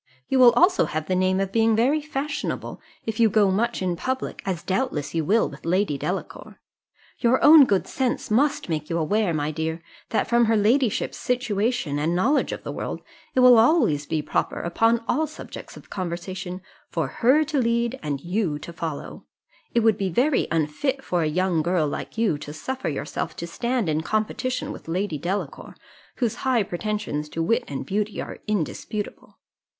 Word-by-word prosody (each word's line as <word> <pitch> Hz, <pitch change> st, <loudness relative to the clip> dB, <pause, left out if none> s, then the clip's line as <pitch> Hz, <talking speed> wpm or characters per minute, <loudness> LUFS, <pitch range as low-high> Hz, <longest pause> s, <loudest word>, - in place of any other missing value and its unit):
You 265 Hz, -, +2 dB
will 250 Hz, -1 st, +9 dB
also 365 Hz, +2 st, +4 dB
have 155 Hz, 0 st, -3 dB
the 185 Hz, -, 0 dB
name 185 Hz, +1 st, +2 dB
of 195 Hz, -1 st, -1 dB
being 225 Hz, +1 st, +3 dB
very 270 Hz, +7 st, +2 dB
fashionable, 295 Hz, 0 st, -4 dB, 0.2 s
if 220 Hz, 0 st, -4 dB
you 225 Hz, -1 st, +5 dB
go 205 Hz, -2 st, +3 dB
much 230 Hz, +1 st, 0 dB
into 175 Hz, -2 st, -2 dB
public, 260 Hz, 0 st, -3 dB
as 180 Hz, -3 st, -2 dB
doubtless 185 Hz, -, -2 dB
you 165 Hz, -1 st, 0 dB
will 215 Hz, +8 st, +3 dB
with 145 Hz, -, -11 dB
Lady 180 Hz, -1 st, +1 dB
Delacour. 180 Hz, +7 st, -5 dB, 0.6 s
Your 245 Hz, +1 st, +3 dB
own 300 Hz, -1 st, +9 dB
good 200 Hz, -6 st, +1 dB
sense 255 Hz, -4 st, -2 dB
must 280 Hz, +6 st, +2 dB
make 155 Hz, -3 st, -3 dB
you 170 Hz, -, 0 dB
aware, 200 Hz, +4 st, +1 dB
my 150 Hz, -1 st, -1 dB
dear, 160 Hz, +1 st, -3 dB, 0.3 s
that 225 Hz, -, 0 dB
from 235 Hz, 0 st, +4 dB
her 225 Hz, 0 st, +3 dB
ladyship's 225 Hz, +3 st, +1 dB
situation 225 Hz, -, -1 dB
and 160 Hz, +4 st, 0 dB
knowledge 265 Hz, +12 st, +2 dB
of -, -, -6 dB
the -, -, -5 dB
world, -, -, -5 dB, 0.3 s
it 255 Hz, -, +4 dB
will 250 Hz, -2 st, +8 dB
always 220 Hz, -, +3 dB
be 155 Hz, -2 st, -1 dB
proper, -, -, -1 dB
upon 225 Hz, +7 st, +2 dB
all 310 Hz, +5 st, +1 dB
subjects 310 Hz, -, -10 dB
of -, -, -15 dB
conversation, 185 Hz, 0 st, -5 dB, 0.3 s
for -, -, -1 dB
her 265 Hz, +6 st, +3 dB
to 300 Hz, -2 st, -1 dB
lead 235 Hz, +1 st, 0 dB
and 145 Hz, -3 st, -3 dB
you 175 Hz, -3 st, -1 dB
to 170 Hz, +3 st, -9 dB
follow: 160 Hz, -3 st, -6 dB, 0.5 s
it 235 Hz, -, +2 dB
would 220 Hz, -2 st, +3 dB
be 195 Hz, -1 st, 0 dB
very 255 Hz, -, +2 dB
unfit 165 Hz, -, -1 dB
for 175 Hz, -7 st, 0 dB
a 155 Hz, -, +1 dB
young 175 Hz, +1 st, +1 dB
girl 170 Hz, -1 st, +1 dB
like 145 Hz, -, -6 dB
you 215 Hz, -10 st, +1 dB
to 150 Hz, -, -8 dB
suffer 260 Hz, +10 st, -4 dB
yourself 145 Hz, 0 st, -4 dB
to 170 Hz, -, -5 dB
stand 235 Hz, +5 st, -1 dB
in 155 Hz, 0 st, 0 dB
competition 220 Hz, +7 st, -2 dB
with -, -, -10 dB
Lady 170 Hz, -2 st, -2 dB
Delacour, 185 Hz, +6 st, -4 dB, 0.4 s
whose 235 Hz, -5 st, -1 dB
high 255 Hz, -4 st, +2 dB
pretensions 185 Hz, -5 st, -3 dB
to 165 Hz, -, -2 dB
wit 230 Hz, +8 st, +1 dB
and 135 Hz, -2 st, -5 dB
beauty 210 Hz, +5 st, -2 dB
are -, -, -6 dB
indisputable. 210 Hz, +1 st, -4 dB
205 Hz, 185 wpm, -24 LUFS, 165-240 Hz, 0.6 s, will